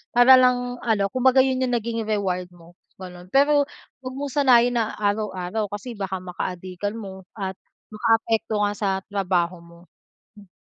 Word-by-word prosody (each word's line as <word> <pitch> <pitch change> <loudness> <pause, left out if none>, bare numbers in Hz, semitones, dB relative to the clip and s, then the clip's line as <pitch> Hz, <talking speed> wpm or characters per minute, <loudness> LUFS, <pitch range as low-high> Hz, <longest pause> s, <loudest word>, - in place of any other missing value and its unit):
para 245 +2 +8
lang 250 -1 +2
ano, 215 -4 +1
kumbaga 260 +1 +3
yun 260 -1 0
yung 255 - -1
naging 230 0 -2
reward 190 -4 -1
mo, 175 0 -18 0.2
gano'n. 180 -1 -10
Pero 285 +1 +4 0.4
huwag 255 0 -6
mong 280 0 -4
sanayin 245 -4 +4
na 220 -1 -1
araw-araw 205 -1 -2
kasi 210 +4 -6
baka 190 -2 -4
makaadikan 185 +2 -5
mo 190 -3 -9
at 190 -2 -4 0.4
makaapekto 225 -1 +1
nga 205 0 +1
sa 205 -1 -1 0.2
trabaho 180 -3 -1
mo. 170 0 -17 0.6
Mm. 205 -1 -16
210 Hz, 155 wpm, -23 LUFS, 190-245 Hz, 0.6 s, para